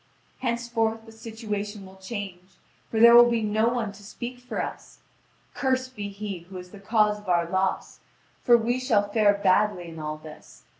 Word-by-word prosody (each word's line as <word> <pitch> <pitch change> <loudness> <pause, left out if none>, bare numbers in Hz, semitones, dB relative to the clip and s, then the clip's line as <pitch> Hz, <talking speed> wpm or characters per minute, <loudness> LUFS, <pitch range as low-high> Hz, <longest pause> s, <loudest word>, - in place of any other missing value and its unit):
Henceforth 235 -2 -1
the 225 - -13
situation 210 -2 -6
will 190 0 -14
change, 190 -2 -7 0.3
for 220 - -1
there 235 +1 +9
will 240 0 +9
be 230 -2 0
no 215 +2 +2
one 235 -4 -2
to 200 +1 -15
speak 240 +4 -7
for 250 - -6
us! - - -6 0.6
Cursed 260 -1 -1
be 205 -2 -4
he 200 -2 -6
who 185 +3 -11
is 180 0 -10
the 205 - -12
cause 210 0 +2
of 205 -2 -10
our 170 -1 +2
loss! 190 +2 -1 0.4
For 240 -2 +6
we 240 +2 0
shall 210 -6 +1
fare 205 -2 +4
badly 195 -2 +2
in 165 -1 -9
all 155 0 -4
this. 155 0 -14
210 Hz, 185 wpm, -26 LUFS, 190-235 Hz, 0.6 s, there